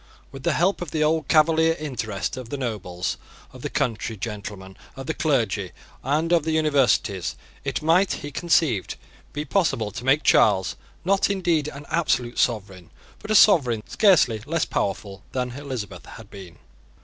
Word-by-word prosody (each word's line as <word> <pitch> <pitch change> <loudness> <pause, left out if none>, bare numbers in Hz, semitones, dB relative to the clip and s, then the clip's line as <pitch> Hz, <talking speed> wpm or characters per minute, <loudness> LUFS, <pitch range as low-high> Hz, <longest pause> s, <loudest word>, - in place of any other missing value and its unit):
With 135 -1 -9
the - - +1
help 180 +3 +1
of 175 - -4
the 155 +1 0
old 155 +1 +1
Cavalier 160 +1 +4
interest, 115 - -4
of 130 -3 -8
the 145 - -4
nobles, 100 -8 -3 0.4
of - - -12
the - - -4
country 115 -1 -2
gentlemen, 100 -3 -7 0.2
of 135 -1 -7
the 160 - -2
clergy, 110 - 0 0.3
and 155 +4 0
of 170 - +4
the 160 - -2
Universities, 140 - +1 0.3
it 140 -1 -3
might, 175 +4 +3
he 145 - -6
conceived, 155 - +1 0.4
be 150 +1 -4
possible 135 - 0
to 110 - -7
make 135 +4 +3
Charles, 95 -3 +3 0.3
not 195 +2 +2
indeed 175 -6 +1
an 145 -1 -8
absolute 125 -8 0
sovereign, 95 -6 -1 0.3
but 210 - -11
a 215 - +2
sovereign 125 - +5
scarcely 150 - +3
less 165 +1 0
powerful 100 0 -3
than 125 -1 -2
Elizabeth 120 -9 -7
had 110 -3 -12
been. 95 -4 -11
135 Hz, 160 wpm, -24 LUFS, 105-160 Hz, 0.4 s, sovereign